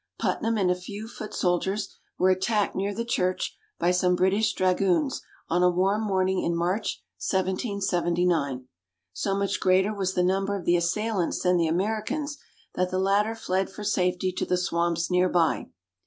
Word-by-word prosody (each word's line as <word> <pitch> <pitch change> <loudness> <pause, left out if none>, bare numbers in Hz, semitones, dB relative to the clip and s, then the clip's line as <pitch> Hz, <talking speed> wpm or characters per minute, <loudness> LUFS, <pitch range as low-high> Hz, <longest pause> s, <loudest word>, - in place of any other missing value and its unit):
Putnam 225 0 0
and 185 -3 +2
a - - +2
few 200 +4 -8
foot 215 -2 -8
soldiers 190 +3 -1 0.2
were 185 +1 +4
attacked 200 +3 0
near 200 +2 -1
the 230 +3 -3
church 185 -5 -1 0.2
by 175 +1 +2
some 180 0 +2
British 200 +4 +2
dragoons 185 - +1 0.3
on 175 +2 +1
a 180 - +5
warm 190 +4 +1
morning 190 -3 +1
in 170 - 0
March, 180 +6 -1 0.2
1779. 180 - 0 0.5
So 195 -1 -1
much 200 0 -1
greater 190 +3 +3
was 190 -2 -2
the 180 - +2
number 195 +2 +1
of 180 - -8
the 175 - +4
assailants 185 +2 0
than 180 0 +3
the 165 -1 +2
Americans, 220 - -2 0.3
that 180 0 0
the 185 - -2
latter 200 +4 +2
fled 190 -3 -1
for 210 - -9
safety 185 -2 +1
to 185 - -3
the 180 - +2
swamps 170 -1 0
near 180 0 +3
by. 170 -2 +1
185 Hz, 170 wpm, -26 LUFS, 180-205 Hz, 0.5 s, a